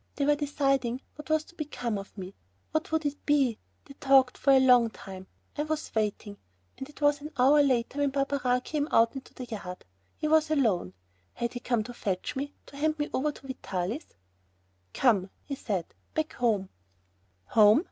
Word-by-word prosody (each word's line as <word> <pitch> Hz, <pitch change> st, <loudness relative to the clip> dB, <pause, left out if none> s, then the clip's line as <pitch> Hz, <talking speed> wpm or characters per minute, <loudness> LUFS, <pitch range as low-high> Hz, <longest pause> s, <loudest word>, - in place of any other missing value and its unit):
They 280 Hz, -, 0 dB
were 295 Hz, -, +5 dB
deciding 275 Hz, -4 st, 0 dB
what 300 Hz, +1 st, -11 dB
was 315 Hz, 0 st, +2 dB
to 340 Hz, -, -19 dB
become 245 Hz, -9 st, -3 dB
of 195 Hz, +2 st, -11 dB
me. 190 Hz, 0 st, -7 dB, 0.4 s
What 315 Hz, 0 st, -1 dB
would 320 Hz, -1 st, 0 dB
it 290 Hz, 0 st, -3 dB
be? 275 Hz, -6 st, +2 dB, 0.3 s
They 280 Hz, -, -12 dB
talked 270 Hz, -2 st, +4 dB
for -, -, -1 dB
a 270 Hz, -, +7 dB
long 250 Hz, -3 st, +6 dB
time. 190 Hz, -3 st, -10 dB, 0.3 s
I 295 Hz, -, -1 dB
sat 310 Hz, -, -9 dB
waiting, 210 Hz, -1 st, -2 dB, 0.4 s
and 265 Hz, -, -8 dB
it 295 Hz, -, -16 dB
was 290 Hz, 0 st, +3 dB
an 300 Hz, -, -6 dB
hour 275 Hz, +4 st, +6 dB
later 260 Hz, 0 st, +1 dB
when 285 Hz, -1 st, +3 dB
Barberin 270 Hz, -2 st, +1 dB
came 295 Hz, +2 st, -2 dB
out 230 Hz, 0 st, +4 dB
into 270 Hz, -1 st, -9 dB
the 255 Hz, -, -6 dB
yard. 200 Hz, -6 st, -7 dB, 0.3 s
He 305 Hz, -, -1 dB
was 315 Hz, 0 st, +4 dB
alone. 220 Hz, -, +1 dB, 0.4 s
Had 235 Hz, 0 st, -2 dB
he 245 Hz, -, -4 dB
come 240 Hz, -3 st, 0 dB
to 245 Hz, -, -8 dB
fetch 190 Hz, -5 st, -3 dB
me 285 Hz, +2 st, -4 dB
to 280 Hz, -, -13 dB
hand 310 Hz, +2 st, +1 dB
me 295 Hz, 0 st, -2 dB
over 300 Hz, +3 st, +1 dB
to 275 Hz, -, -15 dB
Vitalis? 230 Hz, -, -4 dB, 0.9 s
"Come," 205 Hz, -7 st, +3 dB
he 280 Hz, -, -6 dB
said, 200 Hz, -10 st, -3 dB, 0.2 s
"back 315 Hz, 0 st, -1 dB
home." 210 Hz, -6 st, 0 dB, 0.8 s
Home! 215 Hz, +3 st, +7 dB
265 Hz, 190 wpm, -28 LUFS, 225-290 Hz, 0.9 s, a